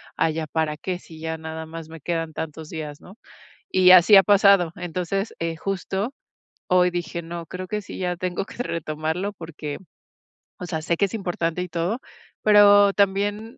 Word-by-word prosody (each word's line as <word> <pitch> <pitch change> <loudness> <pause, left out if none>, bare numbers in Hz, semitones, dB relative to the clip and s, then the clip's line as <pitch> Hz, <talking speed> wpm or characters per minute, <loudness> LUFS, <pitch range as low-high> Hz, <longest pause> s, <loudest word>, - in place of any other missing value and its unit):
"Ay, 160 -1 +1
¿ya 160 -1 -2
para 155 -1 -1
qué?, 180 0 -4
si 160 -3 -14
ya 160 0 -4
nada 160 0 -6
más 160 0 -9
me 165 -2 -11
quedan 165 -1 -3
tantos 160 0 -6
días", 150 -3 -7
¿no? 195 +5 -15 0.5
Y 185 -1 +5
así 185 +3 +8
ha 195 - +9
pasado. 200 -4 +5
Entonces, 180 +3 -3
eh, 165 -1 -3
justo, 195 +6 -3 0.5
hoy 180 0 +4
dije: 170 0 -4
"No, 170 0 -7
creo 185 +2 -6
que 210 -1 -3
sí, - - -9
ya 180 -1 -1
tengo 180 +1 -3
que 245 - -6
retomarlo 160 +3 -3
porque, 160 -5 -7 0.8
o 180 - -6
sea, 160 -2 -3
sé 170 0 0
que 200 - +3
es 195 - -5
importante 175 -3 -2
y - - -6
todo. 175 +8 -2 0.4
Pero 205 -1 +7
también 205 +3 0
175 Hz, 180 wpm, -23 LUFS, 160-195 Hz, 0.8 s, ha